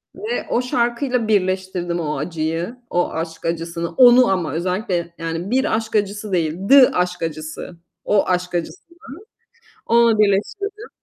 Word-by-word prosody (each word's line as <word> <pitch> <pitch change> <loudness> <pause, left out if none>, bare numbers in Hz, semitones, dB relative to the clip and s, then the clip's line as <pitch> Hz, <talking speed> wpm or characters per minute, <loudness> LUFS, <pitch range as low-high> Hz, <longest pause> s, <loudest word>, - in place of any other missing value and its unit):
ve 455 +3 -4
o 240 - +1
şarkıyla 245 0 -1
birleştirdim 185 -3 -1
o 150 -2 -2
acıyı, 165 +6 -3
o 175 0 0
aşk 165 0 -5
acısını. 170 0 -3
Onu 250 -1 +6
ama 180 -4 -1
özellikle 175 0 -2
yani 165 +5 -4
bir 265 -1 +1
aşk 225 0 -5
acısı 205 0 -1
değil, 165 -2 0
The 275 -2 +8
aşk 180 -1 -1
acısı. 155 +2 -6 0.3
O 205 -2 +2
aşk 180 -1 -1
acısını. 340 - -6 0.9
Onu 230 -2 +4
birleştirdim. 400 - 0
185 Hz, 135 wpm, -20 LUFS, 170-235 Hz, 0.9 s, The